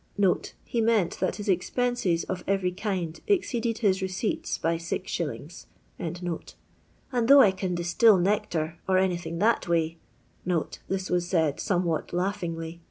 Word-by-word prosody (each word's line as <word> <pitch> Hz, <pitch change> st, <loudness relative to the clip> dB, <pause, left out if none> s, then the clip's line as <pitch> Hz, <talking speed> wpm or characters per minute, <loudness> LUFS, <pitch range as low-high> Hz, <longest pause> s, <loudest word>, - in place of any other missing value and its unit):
"* -, -, -13 dB
[he 235 Hz, -, -1 dB
meant 220 Hz, -6 st, +2 dB
that -, -, 0 dB
his 205 Hz, -, -7 dB
ex 185 Hz, -2 st, +1 dB
penses, 245 Hz, -9 st, 0 dB
of 180 Hz, -1 st, -4 dB
eyery 190 Hz, -2 st, 0 dB
kind, 185 Hz, -5 st, -3 dB
exceeded 240 Hz, -, +1 dB
his 190 Hz, -1 st, +3 dB
receipts 190 Hz, +3 st, -2 dB
by 165 Hz, +1 st, 0 dB
Gs.], 170 Hz, -1 st, -4 dB, 0.3 s
and 175 Hz, 0 st, -4 dB, 0.8 s
though 280 Hz, +1 st, +9 dB
I 200 Hz, -, +6 dB
can 185 Hz, -1 st, -3 dB
distil 175 Hz, +5 st, +4 dB
nectar, 170 Hz, -4 st, 0 dB
or 185 Hz, -, +4 dB
anything 175 Hz, -3 st, 0 dB
that 220 Hz, +3 st, +2 dB
way 165 Hz, -1 st, 0 dB, 0.4 s
" -, -, -32 dB, 0.4 s
[this 190 Hz, -1 st, -2 dB
was 175 Hz, -1 st, +1 dB
said 160 Hz, -5 st, +1 dB
somewhat 175 Hz, -4 st, -1 dB
laughingly! 170 Hz, -3 st, -3 dB
180 Hz, 145 wpm, -27 LUFS, 170-200 Hz, 0.8 s, though